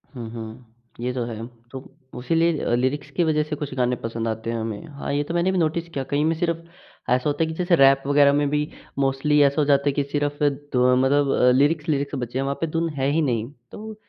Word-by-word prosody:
हुँ, 115 -3 -6
हुँ। 115 0 -10 0.2
ये 125 +1 -2
तो 125 -1 -2
है, 115 -1 -6 0.3
तो 135 - -6 0.4
उसी 125 +7 -1
लिए 165 -6 +2
लिरिक्स 135 +4 -1
की 175 - +4
वज़ह 155 -2 +2
से 150 - -2
कुछ 145 -2 -6
गाने 125 -1 +1
पसंद 115 -1 -4
आते 110 0 -3
हैं 115 - -2
हमें। 110 +1 -5
हाँ, 140 -1 -5
ये 145 +1 +1
तो 155 - -6
मैंने 175 +2 +1
भी 190 - -1
नोटिस 170 0 0
किया 140 -5 -4
कई 145 +1 +1
में 160 +1 +1
सिर्फ़ 170 -1 0 0.5
ऐसा 125 +4 +2
होता 145 +3 0
है - - 0
कि 160 - -4
जैसे 180 -1 +3
रैप 135 -2 +5
वग़ैरह 140 0 +5
में 145 0 +1
भी 150 +1 0 0.3
मोस्टली 135 +2 +2
ऐसा 140 +2 +2
हो - - +2
जाता 140 0 +2
है - - +2
कि 145 - 0
सिर्फ 145 0 -2
धु 145 -3 0
अ, 125 0 +4
मतलब 135 -1 +3
लिरिक्स-लिरिक्स 145 -1 +1
बचे 120 -1 -4
हैं - - 0
वहाँ 140 +1 -2
पे 165 - +1
धुन 165 +1 -1
है 135 -1 0
ही 160 +2 +2
नहीं, 120 -4 -1 0.2
तो 220 +1 -8
140 Hz, 245 wpm, -23 LUFS, 125-150 Hz, 0.5 s, रैप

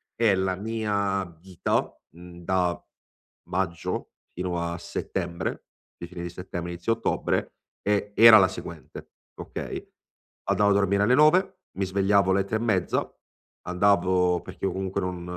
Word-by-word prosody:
E 110 -4 +3
la 95 -1 0
mia 100 -2 -1
vita, 85 +1 -2 0.2
mhmm, 85 0 -13
da 90 -1 0 0.7
maggio 90 -2 -3 0.2
fino 90 -1 -3
a 85 0 -3
settembre, 85 +1 -4 0.3
di 85 - -7
fine 85 -1 -8
di 85 - -4
settembre, 90 -1 -6
inizio 85 +7 0
ottobre, 115 - -1 0.3
è 105 0 0
era 115 -1 +10
la 95 -2 +6
seguente - - -9 0.3
okay, - - -6 0.6
andavo 100 -1 +3
a - - +5
dormire 100 0 +2
alle 125 +4 +4
9, 175 +6 +4 0.2
mi 95 - 0
svegliavo 100 0 +2
alle 95 0 +3
3 110 +3 -2
e - - -5
mezza, 105 -6 0 0.6
andavo 90 -1 +2
perché - - -7
io - - 0
comunque 95 0 -3
non 90 -1 -4
95 Hz, 145 wpm, -26 LUFS, 90-100 Hz, 0.7 s, era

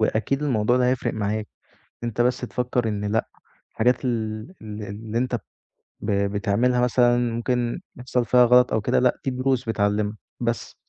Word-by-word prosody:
وأكيد 110 +6 0
الموضوع 120 -4 +2
ده 125 -1 +3
هيفرق 130 0 0
معاك 105 0 -2 0.6
أنت 120 0 -1
بس 125 +1 +2
تفكّر 125 -1 -1
إن 105 -1 -2
لأ، 110 +2 0 0.4
الحاجات 125 +3 +1
ال 110 -3 -1 0.2
ال 105 -1 -7
اللي 105 +3 -5
أنت 125 0 0
ب - - -3 0.7
ب 100 0 +1
بتعملها 120 +4 +1
مثلًا 120 0 +4 0.2
ممكن 120 +4 -1 0.2
يحصل 125 -1 -1
فيها 125 +1 +5
غلط 125 0 +5
أو 110 - +2
كده - - +2
لأ، 125 - +2
دي 135 - +1
دروس 130 -2 0
بتعلّمك. 105 0 0 0.3
بس. 115 -1 -2
120 Hz, 165 wpm, -24 LUFS, 110-125 Hz, 0.7 s, فيها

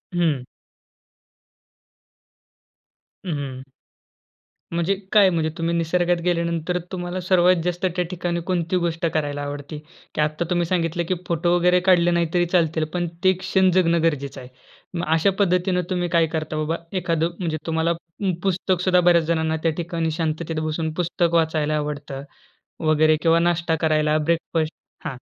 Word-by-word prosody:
हं. 160 -7 +1 2.8
हं, 180 - -3
हं. 130 -2 -6 1.1
म्हणजे 170 +3 +1 0.2
काय 205 -3 +6
म्हणजे? 165 -3 0
तुम्ही 165 0 -1
निसर्गात 175 +1 +1
गेल्यानंतर 170 0 0
तुम्हाला 180 0 -4
सर्वात 180 0 +4
जास्त 175 +1 -1
त्या 180 -1 0
ठिकाणी 175 -1 -2
कोणती 175 -1 0
गोष्ट 165 0 -1
करायला 145 -2 -1
आवडते? 145 +1 -6 0.4
की - - +1
आत्ता 155 +3 0
तुम्ही 175 -1 +1
सांगितलं 170 -1 0
की 185 - +1
फोटो 175 +1 +1
वगैरे 180 +1 +4
काढले 175 -2 +5
नाही 170 -1 +2
तरी 175 -1 +3
चालतील 165 -3 +2
पण 175 -1 -1 0.2
ते 185 0 +5
क्षण 190 0 +2
जगणं 170 -2 +3
गरजेचं 140 -4 -1
आहे. 125 - -11 0.4
मग 175 0 -2
अशा 165 +5 +3
पद्धतीने 180 -1 +2
तुम्ही 180 -2 -1
काय 165 -1 +3
करता? 155 -1 -3
बाबा 155 +2 -1 0.2
एखाद 165 -3 0 0.2
म्हणजे, 165 -4 -2
तुम्हाला 165 +1 +1
पु 170 +3 -4
पुस्तक 185 -1 0
सुद्धा 180 -1 +4
बऱ्याच 175 -1 +4
जणांना 160 -1 +1
त्या 165 - +3
ठिकाणी 165 -2 -2
शांततेत 160 0 -2
बसून 155 0 -2
पुस्तक 170 0 0
वाचायला 155 -2 +1
आवडतं 145 -2 -4 0.7
वगैरे 155 0 +4
किंवा 165 0 +4
नाष्टा 170 -1 +1
करायला 155 -1 +2
ब्रेकफास्ट 160 0 -1 0.3
हां. 130 - -4
170 Hz, 150 wpm, -23 LUFS, 155-175 Hz, 2.8 s, काय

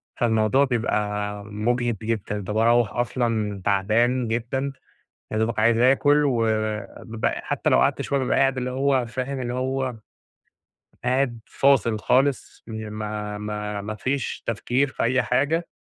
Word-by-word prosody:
فالموضوع 110 +2 +2
بيبقى 105 -4 -1
مجهِد 115 +2 -1
جدًا، 110 -2 -2
كنت 100 0 -5
باروّح 115 0 +3
أصلًا 115 -4 -1
تعبان 115 +5 +2
جدًا 120 +5 -2 0.6
يا 110 - 0
دوبك 110 0 0
عايز 115 +1 +4
آكل 145 +4 +4
و 140 - +2
و 110 -2 0 0.2
ب 110 -1 -3
حتى - - -1
لو - - +5
قعدت 65 - +2
شوية 140 - 0
بابقى 130 - +1
قاعد 135 0 +3
اللي 125 0 -2
هو 135 -1 +1
فاهم 130 +3 -4
اللي 120 -1 -3
هو 130 0 -1 1.1
قاعد 125 -2 +1
فاصل 120 -5 +2
خالص، 135 +5 +1
ي 110 -1 -6
ما 105 -1 -4
ما 105 0 -4
ما 105 +2 -5
فيش 130 +5 -2
تفكير 120 +5 0
في - - -4
أي 125 +2 +2
حاجة، 145 +7 0
115 Hz, 150 wpm, -24 LUFS, 105-130 Hz, 1.1 s, لو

